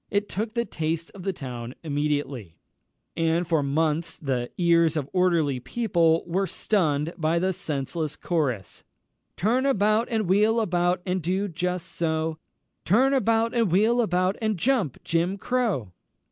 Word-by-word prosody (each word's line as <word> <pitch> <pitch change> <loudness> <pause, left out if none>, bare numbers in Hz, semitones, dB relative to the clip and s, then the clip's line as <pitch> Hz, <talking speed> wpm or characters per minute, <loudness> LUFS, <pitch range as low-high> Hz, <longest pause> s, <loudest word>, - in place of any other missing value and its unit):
It 205 0 0
took 215 +4 -4
the 235 0 +1
taste 165 -1 -3
of 195 - -10
the 195 +2 -1
town 125 -6 -7
immediately, 145 - -2 0.6
and 165 +1 +1
for 160 -3 +2
months 155 +3 0
the 125 -4 -2
ears 170 -2 +3
of 140 -3 -2
orderly 170 -7 +2
people 170 - +1
were 190 +3 0
stunned 160 -7 0
by 160 +1 +1
the 185 +2 +1
senseless 155 -2 -3
chorus 130 - -2 0.5
"Turn 245 +8 +2
about 215 -2 +2
and 220 -4 0
wheel 210 +5 +3
about, 180 -3 +1
And 185 0 -1
do 190 +5 -1
just 180 0 -3
so 160 -1 -2 0.4
Turn 255 +9 +3
about 230 -3 +2
and 230 -7 +1
wheel 220 +6 +3
about, 185 -2 +1
And 215 -3 0
jump, 220 - +1
Jim 170 +4 0
Crow!" 205 - -1
175 Hz, 145 wpm, -25 LUFS, 155-205 Hz, 0.6 s, ears